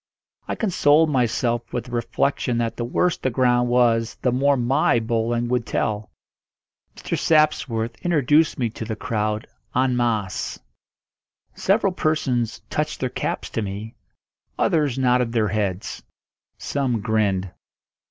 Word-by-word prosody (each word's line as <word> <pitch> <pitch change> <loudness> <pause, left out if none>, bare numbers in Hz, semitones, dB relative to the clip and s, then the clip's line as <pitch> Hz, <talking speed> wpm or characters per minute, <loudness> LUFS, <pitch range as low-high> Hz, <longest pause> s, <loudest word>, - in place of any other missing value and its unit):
I - - -2
consoled 160 -6 +3
myself 120 -2 0
with 120 - -2
the 125 - -11
reflection 120 +1 0
that 115 -1 -1
the 120 - -3
worse 175 +9 +1
the 130 - -1
ground 125 0 +2
was 115 -2 +2
the 125 - +3
more 140 +3 +3
my 125 0 +2
bowling 115 +1 -1
would 125 -1 +1
tell. 110 -1 -2 0.9
Mr. - - -3
Sapworth 140 -7 +1
introduced 155 -2 +3
me 120 -4 -1
to 115 - -7
the 110 0 -4
crowd 110 -2 -2 0.3
en 130 0 +2
masse. 110 -6 -1 1.0
Several 195 -1 +1
persons 130 -9 0
touched 150 0 -2
their 130 - -1
caps - - -3
to 115 - -2
me; 105 +2 -5 0.6
others 145 -6 +1
nodded 125 -2 +2
their 110 -3 +2
heads; 100 -2 -2 0.6
some 130 -6 -1
grinned. 100 -4 0
120 Hz, 135 wpm, -23 LUFS, 115-135 Hz, 1.0 s, consoled